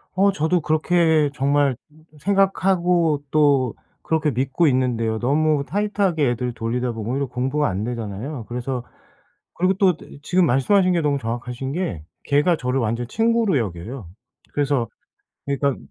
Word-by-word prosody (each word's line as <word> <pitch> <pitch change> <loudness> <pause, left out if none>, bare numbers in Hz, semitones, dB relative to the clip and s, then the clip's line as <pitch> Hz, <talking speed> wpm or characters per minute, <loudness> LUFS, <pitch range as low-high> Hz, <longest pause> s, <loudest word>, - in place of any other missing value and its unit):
어 195 +1 +4
저도 160 +4 +1
그렇게 155 0 +2
정말 140 -1 +2 0.4
생각하고 180 -4 +2
또 140 -5 +3 0.3
그렇게 160 -1 0
믿고 135 +6 +1
있는데요. 120 -4 +1
너무 150 +3 +2
tight 205 +3 -2
하게 160 -9 +2
애들 120 0 -3
돌리다 120 +2 -2
보면 115 +1 -4
오히려 140 +1 0
공부가 130 +4 -1
안 95 +3 -3
되잖아요. 115 +2 -5
그래서 125 +1 -3 0.7
그리고 185 +2 +2
또 185 -2 +3
뜨 - - -14
이 145 - -13
지금 180 +3 +2
말씀하신 180 +9 +3
게 170 - +1
너무 145 -2 +1
정확하신 125 +3 -4
게 150 - -3 0.2
걔가 150 +4 +3
저를 125 0 -1
완전 115 +2 -2
친구로 225 - +2
여겨요. 105 +2 -5 0.5
그래서 140 -4 0 0.6
그러니까 140 -1 0
140 Hz, 345 characters per minute, -22 LUFS, 125-170 Hz, 0.7 s, 어